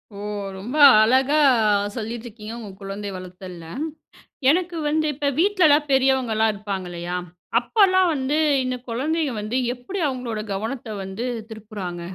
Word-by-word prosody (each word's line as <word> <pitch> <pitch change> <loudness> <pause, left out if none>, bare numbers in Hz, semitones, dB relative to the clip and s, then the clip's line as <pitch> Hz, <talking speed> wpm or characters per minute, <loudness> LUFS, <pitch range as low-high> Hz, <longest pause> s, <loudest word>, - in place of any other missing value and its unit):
ஓ! - - -9 0.4
ரொம்ப 225 +9 -6 0.2
அழகா 260 +6 +4 0.6
சொல்லிட்டிருக்கீங்க, 225 -1 -6
உங்க 220 -3 -8
குழந்தை 200 +1 -5
வளர்த்தல்ல. 185 -1 -9 0.9
எனக்கு 345 +1 +1
வந்து 310 +1 +1
இப்ப 285 +1 -1
வீட்ல 380 0 +3
எல்லாம் 295 0 +4
பெரியவங்க 265 -3 +3
எல்லாம் 220 0 +3
இருப்பாங்க 200 -3 -5
இல்லையா? 175 +1 -4 0.4
அப்போல்லாம் 375 - +3
வந்து 280 +1 -1 0.3
இந்த 255 0 -2
குழந்தைங்க 290 +4 -1
வந்து 215 +4 -2 0.2
எப்படி 315 +11 -6
அவுங்களோட 250 -4 -4
கவனத்த 220 +2 -4
வந்து 190 +5 -5 0.3
திருப்புறாங்க? 205 -5 -7
240 Hz, 130 wpm, -23 LUFS, 205-290 Hz, 0.9 s, அழகா